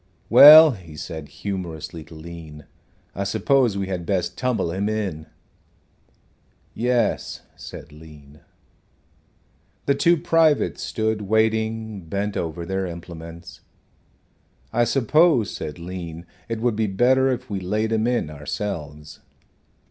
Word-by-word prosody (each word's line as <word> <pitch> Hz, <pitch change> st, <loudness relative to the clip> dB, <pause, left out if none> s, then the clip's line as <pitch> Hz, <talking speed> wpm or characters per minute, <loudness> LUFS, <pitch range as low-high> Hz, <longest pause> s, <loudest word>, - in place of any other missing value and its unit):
"Well," 150 Hz, +5 st, +10 dB
he 90 Hz, -, -11 dB
said, 80 Hz, -1 st, -7 dB
humorously 85 Hz, -5 st, -6 dB
to 80 Hz, -, -14 dB
Lean, 80 Hz, -2 st, -10 dB, 0.5 s
"I 100 Hz, -, -3 dB
suppose 120 Hz, +2 st, +1 dB
we 100 Hz, -, -2 dB
had 95 Hz, -2 st, -4 dB
best 90 Hz, -1 st, -2 dB
tumble 120 Hz, -9 st, -1 dB
him 100 Hz, +4 st, -2 dB
in." 95 Hz, -8 st, -3 dB, 1.5 s
"Yes," 120 Hz, 0 st, -1 dB
said -, -, -10 dB
Lean. 75 Hz, -1 st, -15 dB, 1.5 s
The 140 Hz, -, +3 dB
two 170 Hz, +5 st, +3 dB
privates 160 Hz, -2 st, +2 dB
stood 110 Hz, -1 st, -2 dB
waiting, 110 Hz, 0 st, 0 dB
bent 100 Hz, +4 st, -3 dB
over 85 Hz, +1 st, -4 dB
their 95 Hz, +1 st, -2 dB
implements. 85 Hz, 0 st, -10 dB, 1.1 s
"I 120 Hz, +1 st, +3 dB
suppose," 135 Hz, -, +3 dB
said 75 Hz, -1 st, -6 dB
Lean, 85 Hz, -1 st, -7 dB, 0.2 s
"it 115 Hz, -1 st, -3 dB
would 120 Hz, -2 st, +1 dB
be 110 Hz, 0 st, 0 dB
better 130 Hz, +7 st, +3 dB
if 125 Hz, -2 st, -4 dB
we 100 Hz, -, -2 dB
laid 105 Hz, +4 st, -2 dB
him 110 Hz, +1 st, +1 dB
in 120 Hz, -11 st, -1 dB
ourselves." 75 Hz, -1 st, -6 dB
100 Hz, 120 wpm, -23 LUFS, 85-115 Hz, 1.5 s, Well